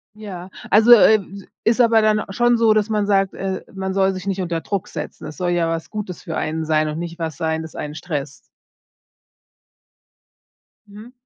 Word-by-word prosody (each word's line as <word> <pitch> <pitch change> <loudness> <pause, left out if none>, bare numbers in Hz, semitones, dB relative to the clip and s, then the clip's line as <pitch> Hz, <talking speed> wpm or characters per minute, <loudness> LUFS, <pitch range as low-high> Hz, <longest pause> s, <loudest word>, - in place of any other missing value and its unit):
Ja. 190 -4 -8 0.2
Also, 220 +4 +6
äh, 220 -1 +7
d 195 0 -11 0.2
ist 230 +2 +3
aber 230 -2 +5
dann 215 -1 +2
schon 240 +4 +2
so, 225 -1 +4
dass 215 0 +1
man 210 -2 +1
sagt, 195 -2 +2
äh, 190 -1 -4
man 190 0 -3
soll 195 0 +2
sich 185 0 -7
nicht 195 -1 -1
unter 170 -2 -2
Druck 200 0 -3
setzen. - - -7
Es 155 - -9
soll 180 -1 -1
ja 170 -1 +1
was 165 -1 -3
Gutes 210 -4 -6
für 160 - -4
einen 160 +1 -2
sein 155 0 +1
und 150 0 -4
nicht 170 0 -6
was 160 -3 -4
sein, 160 +1 -1
das 160 -1 -10
einen 150 0 -5
stresst. 145 -5 -6 2.4
Mhm. 210 +4 -12
190 Hz, 190 wpm, -21 LUFS, 165-215 Hz, 2.4 s, äh